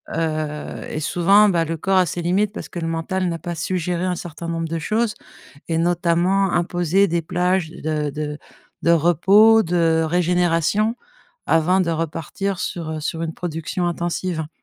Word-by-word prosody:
heu 155 -2 -3
et 155 - -4
souvent, 195 +6 +4
bah, 170 -3 +1
le 165 +1 -3
corps 190 +4 +1
a 180 - +4
ses 175 +1 -4
limites 195 +5 +1
parce - - -7
que 175 - -6
le 165 - -3
mental 175 +3 -2
n'a 165 -1 -4
pas 175 +2 -5
su 180 +3 -2
géré 175 +1 -2
un 180 -1 0
certain 170 0 -7
nombre 165 -1 -2
de 165 - -2
choses 215 +6 0 0.5
et 165 - 0
notamment, 175 +2 +2
imposer 175 +3 +2
des 170 +1 0
plages 180 0 0
de 150 -2 -3
de 150 +1 -5 0.4
de 170 - +3
repos, 195 +7 +5
de 165 -2 +2
régénération 180 +5 +1 0.5
avant 175 +4 +3
de 170 -2 0
repartir 165 +4 -3
sur, 165 -3 -4
heu, 155 - -4
sur 160 +2 -3
une 165 -1 -3
production 175 +1 -3
intensive, 175 0 -2
hein. 155 - -5
170 Hz, 175 wpm, -21 LUFS, 160-185 Hz, 0.5 s, repos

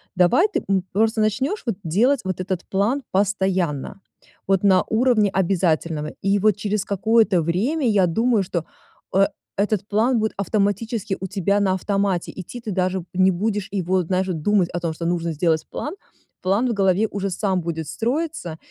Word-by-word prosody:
Давай 185 - +4
ты, 420 - -3
м, 190 -2 +2
просто 220 +2 +2
начнешь 260 - 0
вот 230 - -1
делать 230 - +2
вот 185 -1 -2
этот 185 -1 -2
план 220 +9 0
постоянно, 190 -5 0 0.5
вот 195 0 +2
на 190 -2 +5
уровне 220 -2 +2
обязательного. 165 -5 0
И 200 +1 +2
вот 210 0 +3
через 205 -1 -1
какое-то 210 -2 +2
время, 230 - 0
я 200 -4 +3
думаю, 225 +4 +2
что 175 -3 -3 0.5
э 195 +1 +5 0.3
этот 205 0 0
план 230 +4 +2
будет 220 0 -1
автоматически 205 +1 -1
у 190 - -4
тебя 200 +2 0
на 190 -2 +2
автомате 195 -1 -1
идти. 190 +6 -7
Ты 220 - -5
даже 185 -1 -1
не 185 +1 +4
будешь 205 +2 -2
его, 185 -1 0
знаешь 185 +2 -1
вот, 170 -4 -3
думать 195 0 +2
о 175 - -1
том, 165 -2 -2
что 165 +1 -6
нужно 170 -1 -1
сделать 160 0 +1
план. 295 - -4 0.5
План 200 +7 +1
в 235 - 0
голове 195 +1 +2
уже 200 -1 -3
сам 190 -1 0
будет 160 -2 -4
строиться, 240 - -3
195 Hz, 175 wpm, -22 LUFS, 180-215 Hz, 0.5 s, на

